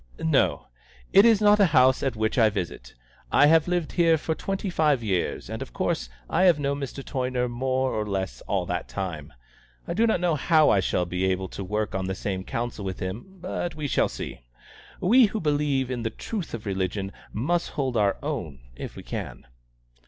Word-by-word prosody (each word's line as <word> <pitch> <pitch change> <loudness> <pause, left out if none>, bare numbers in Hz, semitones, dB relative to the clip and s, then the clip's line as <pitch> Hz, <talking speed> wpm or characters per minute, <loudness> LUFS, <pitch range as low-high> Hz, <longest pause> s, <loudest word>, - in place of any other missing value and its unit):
"No; 80 - +1 0.5
it 200 +3 +8
is 225 -3 +5
not 210 0 +5
a 200 - +6
house 130 0 +5
at 135 -3 -1
which 110 0 0
I 110 -2 +6
visit. 90 - -5 0.4
I - - +6
have 160 +2 +5
lived 175 -3 -1
here 165 -2 +4
for 160 +1 -2
twenty 195 +3 -3
five 150 -7 +2
years, 95 -5 -1
and - - -6
of - - -7
course - - -1 0.2
I 185 - +2
have 175 -4 +6
known 140 -1 -1
Mr. 135 0 -5
Toyner 125 -2 -1
more 130 +2 -1
or 110 - -1
less 95 -11 -3
all - - 0
that - - -3
time. 85 -6 -5 0.6
I - - -2
do 225 +6 +3
not 220 - +2
know 175 -1 +1
how 155 +1 +4
I 100 - +4
shall 90 -1 0
be 90 +2 -2
able 95 0 -1
to 100 - -6
work 105 +2 -2
on 95 -1 -2
the 95 - -2
same 95 -2 -3
Council 115 0 -4
with 95 -1 -4
him; 115 - -6
but 175 -2 -3
we 155 -1 -4
shall - - +2
see. - - -7 0.6
We, 235 +7 +6
who 215 +1 -2
believe 145 -5 0
in 125 -2 -2
the 115 - -1
truth 185 - -5
of 115 - -9
religion, 95 0 -2 0.2
must 170 +11 0
hold 130 -4 -2
our 100 -3 +2
own 105 - -4 0.2
if - - -7
we - - -9
can." - - -6
130 Hz, 205 wpm, -26 LUFS, 95-160 Hz, 0.6 s, it